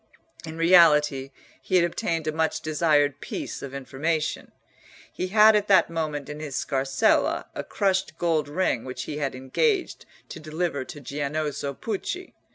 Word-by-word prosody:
In 160 +1 -7
reality 150 -5 +5 0.3
he 130 - -2
had 175 -2 +5
obtained 165 -1 -2
a 155 - 0
much 160 +1 -1
desired 150 -3 +2
piece - - -5
of 140 - -7
information. 150 +4 -2 0.6
He 185 - -3
had 215 +2 +6
at 210 0 +1
that 190 -4 +4
moment 155 -4 -3
in 150 +1 -7
his 150 -3 -6
scarsella 135 0 +1
a - - -4
crushed 190 -5 -1
gold 160 -4 0
ring 150 -7 0
which 130 0 -6
he 150 +2 -5
had 140 -3 -2
engaged 360 - -1 0.2
to - - -8
deliver 155 -2 -3
to 145 - -10
Giannozzo 145 +1 -3
Pucci. 290 - -5
155 Hz, 155 wpm, -25 LUFS, 140-175 Hz, 0.6 s, had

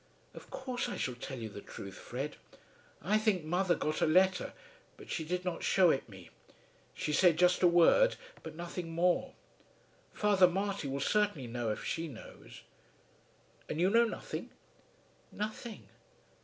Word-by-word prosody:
"Of - - -12
course 260 -2 -3
I - - -4
shall 125 - -2
tell 130 +2 -7
you 115 -2 -5
the 100 -1 -9
truth, 100 -1 -9
Fred. 135 +9 -6 0.7
I 210 +6 +3
think 215 -6 +1
mother 175 +3 +1
got 155 - -2
a - - +4
letter, 185 +3 +3 0.4
but - - -11
she 160 - -2
did 180 +3 -3
not 180 -2 -2
shew 185 -3 +5
it 135 - -2
me. 95 -4 -13 0.6
She 150 - -2
said 170 +1 +5
just 180 +1 +4
a 180 - +7
word, 175 - +5 0.3
but - - -9
nothing 175 0 -5
more. 175 +2 +1 0.8
Father 200 -3 +4
Marty 195 -2 -2
will 135 +1 -3
certainly 205 -7 +1
know 120 -1 -3
if 105 - -3
she 165 0 -2
knows." 130 -7 -12 1.1
"And 155 - -3
you 185 +3 +3
know 235 +2 +5
nothing?" 225 - -5 0.8
"Nothing." 215 +2 -6
175 Hz, 155 wpm, -32 LUFS, 145-195 Hz, 1.1 s, a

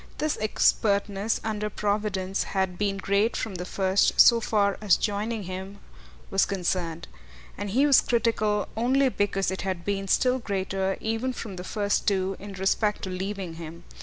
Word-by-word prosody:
This 310 0 0
expertness, 205 -1 +1
under 210 -1 -2
providence, 200 -2 -1 0.2
had 190 -2 0
been 200 -1 0
great 200 +3 +1
from 220 - -3
the 180 -1 -5
first, 190 +1 +1
so 235 -1 +7
far 200 -3 +1
as 200 -6 +4
joining 210 +1 -2
him 190 +2 -7 0.5
was 195 - +3
concerned; 175 -3 -2 0.5
and 205 0 -5
he 260 +8 +3
was 280 -3 +6
critical 215 -3 +1
only 260 +4 +2
because 200 -4 0
it 190 - -4
had 185 -3 -3
been 195 -1 -2
still 255 +6 +2
greater, 195 -3 -2
even 225 +4 -1
from 215 -5 -7
the 180 - -7
first 205 +1 -1
too, 195 -1 +1
in 200 0 -8
respect 195 +2 0
to 190 - -3
leaving 185 -2 -4
him. 165 +1 -9
200 Hz, 165 wpm, -26 LUFS, 190-215 Hz, 0.5 s, so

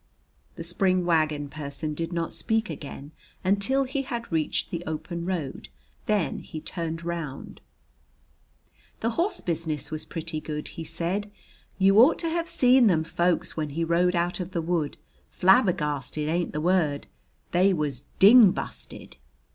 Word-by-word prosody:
The 165 - -6
spring 185 +1 +1
wagon 155 -4 +1
person 150 +1 -5
did 165 +2 -4
not 170 -1 -2
speak 220 0 0
again 140 0 -8 0.3
until 200 +8 +2
he 270 +1 -2
had 235 -5 -5
reached 160 -2 0
the 170 -1 -4
open 165 +2 -4
road. 145 - -4 0.4
Then 210 -5 0
he 155 - -8
turned 165 +1 -5
round. 165 -6 -5 1.4
"The 230 - 0
horse 345 - 0
business 160 -4 -2
was 155 0 -4
pretty 160 -1 -5
good," 150 -1 -5
he 165 - -7
said. 175 +6 -3 0.5
"You 195 +2 +5
ought 260 +7 +7
to 335 - -1
hev 335 +1 -1
seen 250 -4 +5
them 165 -5 +3
folks 175 +2 0
when 155 -2 -2
he 165 +4 -2
rode 175 +2 +2
out 175 +2 0
of 180 0 -5
the 170 - 0
wood. 165 -3 -1 0.3
Flabbergasted 155 - +2
ain't 170 +2 0
the 150 - -3
word. 165 -5 +1 0.5
They 185 +3 +4
was 150 -6 -1
ding 215 +1 +9
busted." - - -6
170 Hz, 150 wpm, -26 LUFS, 155-195 Hz, 1.4 s, ding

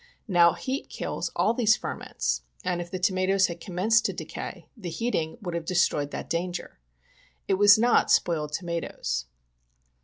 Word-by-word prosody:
Now, 175 -4 +5
heat 270 +2 -4
kills - - -3
all 190 +6 +2
these 220 -3 +3
ferments, 60 +1 -3 0.2
and 175 -1 -1
if 175 - -7
the 185 - -3
tomatoes 185 +1 +2
had 170 -1 -4
commenced 200 +7 +2
to - - 0
decay, - - -7
the 195 -8 -6
heating 165 -3 -2
would 175 -3 -4
have 170 -1 -2
destroyed 160 -5 +1
that - - -6
danger. 175 - -4 0.7
It 190 - +1
was 205 0 +8
not 240 +2 +3
spoiled 155 -3 +2
tomatoes. 150 - -3
180 Hz, 155 wpm, -27 LUFS, 170-205 Hz, 0.7 s, was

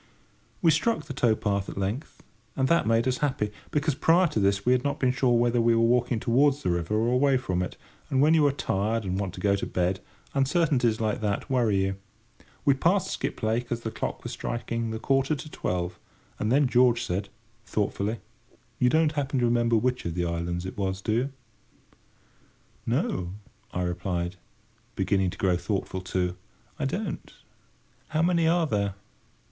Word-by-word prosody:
We 165 - +6
struck 160 +3 +1
the - - -6
tow 120 -4 +2
path 100 -2 -1
at - - -8
length, 100 +10 -4 0.3
and 130 -1 +1
that 170 -6 +3
made 115 +2 +3
us 130 -1 0
happy; 130 -8 0 0.2
because 150 +1 +1
prior 165 +6 +4
to 130 - -1
this 100 0 +1
we 125 - +4
had 125 0 +3
not 140 - -1
been 130 -1 +3
sure 125 -2 +2
whether 120 0 +2
we 115 0 +4
were 115 - +3
walking 120 0 +2
towards 140 +5 +2
the 90 - +1
river 85 +4 -1
or 115 +2 +2
away 135 +1 +4
from 95 -8 -1
it, 90 - -4 0.3
and 135 - +1
when 150 +3 +5
you 155 -3 +5
are - - +3
tired 110 -3 -1
and 95 +1 -1
want 95 -2 -3
to - - -8
go 100 -1 +2
to 100 - -3
bed 90 +1 0 0.3
uncertainties 135 -5 +2
like 110 -1 -1
that 105 +5 -2
worry 110 -7 +2
you. 95 0 -2 0.7
We 140 - +6
passed 175 +8 +1
Skiplake 115 +3 -2
as 120 -1 -1
the 110 - -4
clock - - -4
was - - -5
striking 115 -1 -3
the 110 - -3
quarter 135 +5 +1
to 150 +2 -9
twelve; 90 0 -3 0.4
and 105 - 0
then 140 +2 +4
George 120 -1 +4
said, 100 -1 -2 0.3
thoughtfully: 105 +1 -1 0.6
"You 125 - +4
don't 160 +2 +3
happen 140 -2 -1
to 125 - +2
remember 120 0 +2
which 125 +3 +1
of 85 -1 -3
the 90 -1 0
islands 85 +1 -2
it 95 - -6
was, 95 -1 -1
do 100 - -2
you?" 125 +5 +1 1.6
"No," 90 0 -1 0.4
I 90 - -2
replied, 90 0 -2 0.6
beginning 95 -1 +1
to - - -8
grow 90 -2 +2
thoughtful 95 0 -3
too, 90 -1 -2 0.4
"I 145 - 0
don't. 185 +5 -3 0.8
How 155 +1 0
many 170 -2 +3
are 170 0 +3
there?" 100 -7 -1
115 Hz, 185 wpm, -27 LUFS, 95-135 Hz, 1.6 s, We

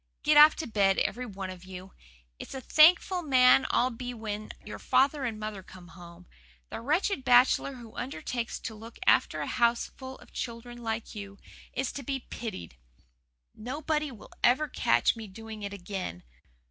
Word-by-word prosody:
"Get 300 0 +4
off 300 +1 +9
to 320 - -4
bed, 200 -4 +2
every 250 +1 -1
one 195 -3 -6
of 185 -1 -11
you. 185 0 -10 0.5
It's - - -8
a - - -4
thankful 340 +7 +5
man 260 -3 +5
I'll 255 +2 +2
be 245 +1 -6
when 215 -1 -5
your - - -7
father 275 +1 +2
and 220 -3 -3
mother 215 -2 -5
come 180 -1 -14
home. 175 0 -13 0.5
The - - -5
wretched 305 - 0
bachelor 250 +2 +4
who 235 -3 -12
undertakes 240 0 -4
to 225 - -5
look 225 +2 -11
after - - +3
a - - -2
houseful 240 +2 -1
of - - -18
children 240 0 -6
like 225 -1 -4
you 200 -1 -8 0.4
is 265 0 -2
to 280 - -6
be 270 0 -3
pitied. 85 - -7 0.8
Nobody 300 +5 -3
will 220 -4 -13
ever 275 +5 +4
catch 120 - +2
me 225 -2 -8
doing 220 +2 -9
it 200 -1 -5
again. 185 - -6
235 Hz, 170 wpm, -29 LUFS, 200-265 Hz, 0.8 s, off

